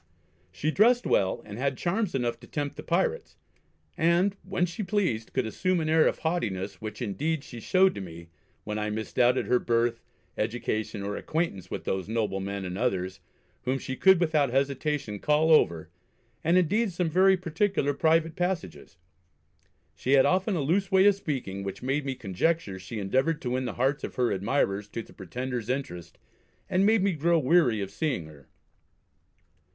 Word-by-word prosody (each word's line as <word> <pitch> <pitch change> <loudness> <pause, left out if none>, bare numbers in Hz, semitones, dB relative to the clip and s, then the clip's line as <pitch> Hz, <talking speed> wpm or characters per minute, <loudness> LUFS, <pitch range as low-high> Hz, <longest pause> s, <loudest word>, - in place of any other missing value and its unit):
She 145 - -1
dressed 240 +7 +4
well, 95 -1 +1
and 105 +1 -8
had 135 0 -1
charms 190 +1 -1
enough 120 -2 -1
to 120 - -14
tempt 145 -2 -3
the - - -7
pirates; - - -1 0.6
and, 175 +4 +2
when 185 -2 -1
she 175 +4 -6
pleased, 185 - -1
could 130 -2 0
assume 185 +10 0
an 155 -1 -1
air 160 0 +5
of - - 0
haughtiness 100 - -2
which 110 +2 -5
indeed 145 +8 -2
she 120 - -9
showed 185 +9 +3
to - - -6
me, 85 -2 -10 0.3
when 105 0 -3
I 105 0 -1
misdoubted 120 +4 +1
her 125 - +3
birth, 115 0 0 0.4
education, 110 -2 -2
or 100 +1 -3
acquaintance 125 - -2
with - - -5
those 95 +1 -2
Noblemen 100 -3 -2
and 90 +1 -5
others, 95 -6 -1 0.5
whom 130 +1 +1
she 130 0 -5
could 190 +4 +5
without 155 -5 +2
hesitation 135 -3 -1
call 150 +5 +2
over, 85 - +3 0.5
and 170 +3 +3
indeed 200 +5 +2
some 175 0 -1
very 190 +4 +4
particular 170 -3 0
private 160 +2 +2
passages. 175 - -3 1.0
She 130 - -1
had 135 -1 +6
often 190 +2 +2
a 165 - 0
loose 185 +7 0
way 190 0 +5
of 205 - +7
speaking, 130 - -4
which 100 +4 -6
made 135 +2 -1
me 135 - -2
conjecture 100 - -1
she 95 +5 -7
endeavoured 130 +10 +1
to 125 - -2
win 130 +1 -1
the 120 - -3
hearts 135 +3 0
of - - -5
her 125 -2 +1
admirers 100 0 0
to 115 +2 -6
the - - -17
Pretender's 125 +4 -5
interest, 125 - -4 0.5
and 190 +2 +3
made 220 -3 +4
me 200 - +3
grow 170 +2 +2
weary 135 -7 +3
of 100 0 -4
seeing 125 - -2
her. 75 -3 -15
135 Hz, 175 wpm, -27 LUFS, 105-170 Hz, 1.0 s, of